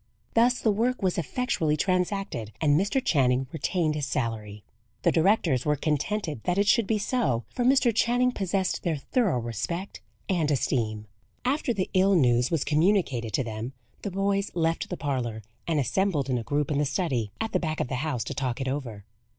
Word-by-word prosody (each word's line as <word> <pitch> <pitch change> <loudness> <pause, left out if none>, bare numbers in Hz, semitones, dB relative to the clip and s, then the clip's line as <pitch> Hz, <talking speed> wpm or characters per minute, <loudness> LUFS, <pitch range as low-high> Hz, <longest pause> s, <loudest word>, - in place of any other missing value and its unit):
Thus 245 +2 +4
the 220 - +2
work 235 +3 0
was 185 -2 +1
effectually 170 - 0
transacted, 185 - -1
and 145 -2 +3
Mr. 200 - +1
Channing 130 -3 +3
retained 160 -1 0
his 150 -2 -2
salary. 110 -6 -3 0.4
The - - +4
directors 165 - +2
were 150 0 +2
contented 155 - -1
that 180 +1 +1
it 200 - +3
should 220 0 +3
be 220 - +2
so, 205 - 0
for 245 - -1
Mr. 255 -2 +4
Channing 245 +3 +2
possessed 195 -4 -1
their 170 -3 0
thorough 190 - 0
respect 120 - -4 0.3
and 170 -6 +1
esteem. 110 -6 0 0.4
After 260 0 +1
the 195 -5 -2
ill 190 +1 +4
news 125 -5 +3
was 165 -4 0
communicated 150 - +1
to 130 - +1
them, 115 +2 -5 0.3
the 200 - -3
boys 195 +1 0
left 165 -1 0
the 180 - -4
parlour, 120 -6 -2 0.2
and 160 -3 +1
assembled 145 -2 0
in 125 - +1
a - - -5
group 145 +3 -1
in 145 - +1
the 150 - +2
study, 130 - -1
at 225 - -2
the 185 - +1
back 155 -3 -2
of - - 0
the 125 - -3
house, 145 -8 -1
to 130 - -5
talk 130 -2 -2
it 135 - -2
over. 125 -7 -4
160 Hz, 190 wpm, -27 LUFS, 130-200 Hz, 0.4 s, Thus